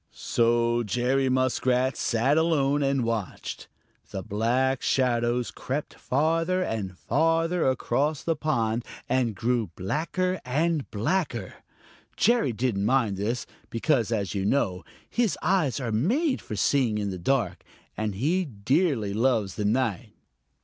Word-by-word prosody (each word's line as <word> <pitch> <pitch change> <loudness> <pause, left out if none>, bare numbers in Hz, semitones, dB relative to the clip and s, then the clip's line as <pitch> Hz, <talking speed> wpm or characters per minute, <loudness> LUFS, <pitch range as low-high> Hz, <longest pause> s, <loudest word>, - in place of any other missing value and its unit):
So 120 0 +1
Jerry 125 +4 +1
Muskrat 130 0 +1
sat 120 +5 +1
alone 145 -3 +2
and 135 -2 +1
watched. 115 -4 -4 0.4
The 95 - -5
black 120 +5 +1
shadows 120 -2 +1
crept 140 +3 -4
farther 165 +6 +1
and 100 - -4
farther 165 - +1
across 135 +3 0
the 165 - 0
pond 120 -7 0 0.2
and 125 -4 +1
grew 115 -2 0
blacker 170 - -1
and 155 +3 0
blacker. 120 - -1 0.6
Jerry 235 - +3
didn't 110 -3 -1
mind 115 -3 +2
this, 110 +5 -2 0.2
because, 115 -1 +1
as 100 -4 -1
you 100 -2 -1
know, 95 -5 0 0.2
his 235 -7 0
eyes 175 -10 +2
are 120 -4 -3
made 250 - +1
for 110 - -6
seeing 120 0 +2
in 100 -2 -2
the 90 - -5
dark, 125 +6 0 0.3
and 105 -2 -2
he 160 - +1
dearly 130 - 0
loves 110 -4 +1
the 105 - -3
night. 115 -1 0
125 Hz, 130 wpm, -26 LUFS, 110-150 Hz, 0.6 s, Jerry